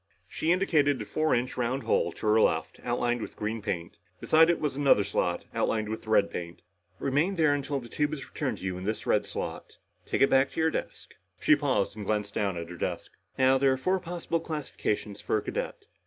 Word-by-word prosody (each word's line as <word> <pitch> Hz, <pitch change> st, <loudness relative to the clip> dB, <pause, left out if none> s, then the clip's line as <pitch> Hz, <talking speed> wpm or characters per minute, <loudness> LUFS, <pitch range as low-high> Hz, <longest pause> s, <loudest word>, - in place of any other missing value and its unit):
She 160 Hz, -, -1 dB
indicated 155 Hz, -7 st, +3 dB
a 105 Hz, -, -4 dB
four 155 Hz, +7 st, +1 dB
inch 125 Hz, +1 st, -1 dB
round 125 Hz, +2 st, -1 dB
hole -, -, +1 dB
to -, -, -8 dB
her 110 Hz, +1 st, +5 dB
left, 80 Hz, -5 st, +1 dB
outlined 120 Hz, 0 st, 0 dB
with -, -, -7 dB
green 110 Hz, +1 st, -3 dB
paint. 85 Hz, -4 st, -4 dB, 0.2 s
Beside 160 Hz, +1 st, +5 dB
it, 170 Hz, -, +2 dB
was 150 Hz, -3 st, -1 dB
another 140 Hz, -7 st, +4 dB
slot 90 Hz, -3 st, -1 dB
outlined 110 Hz, -1 st, 0 dB
with 110 Hz, 0 st, -5 dB
red 105 Hz, -2 st, +3 dB
paint. 85 Hz, 0 st, -6 dB, 0.3 s
"Remain 145 Hz, -, +1 dB
there 155 Hz, -4 st, +4 dB
until 140 Hz, 0 st, -2 dB
the 120 Hz, -, -10 dB
tube 145 Hz, +5 st, -1 dB
is 150 Hz, -3 st, -5 dB
returned 145 Hz, -5 st, -3 dB
to -, -, -12 dB
you 90 Hz, -1 st, -3 dB
in 95 Hz, -, -7 dB
the 110 Hz, +2 st, -1 dB
red -, -, +2 dB
slot. -, -, -6 dB, 0.3 s
Take -, -, +2 dB
it 135 Hz, -, +5 dB
back 135 Hz, 0 st, +4 dB
to -, -, -4 dB
your 160 Hz, 0 st, +3 dB
desk." -, -, -5 dB, 0.3 s
She 155 Hz, -, +5 dB
paused 130 Hz, -10 st, 0 dB
and 105 Hz, -, -6 dB
glanced 105 Hz, 0 st, -1 dB
down 100 Hz, -4 st, -1 dB
at 85 Hz, 0 st, -6 dB
her 90 Hz, -, -8 dB
desk. -, -, -3 dB, 0.3 s
"Now, 130 Hz, 0 st, +4 dB
there 135 Hz, -1 st, +4 dB
are -, -, -2 dB
four 185 Hz, +8 st, +1 dB
possible 170 Hz, -1 st, -3 dB
classifications 140 Hz, -10 st, -3 dB
for -, -, 0 dB
a -, -, -1 dB
cadet. -, -, -4 dB
130 Hz, 220 wpm, -28 LUFS, 105-150 Hz, 0.3 s, her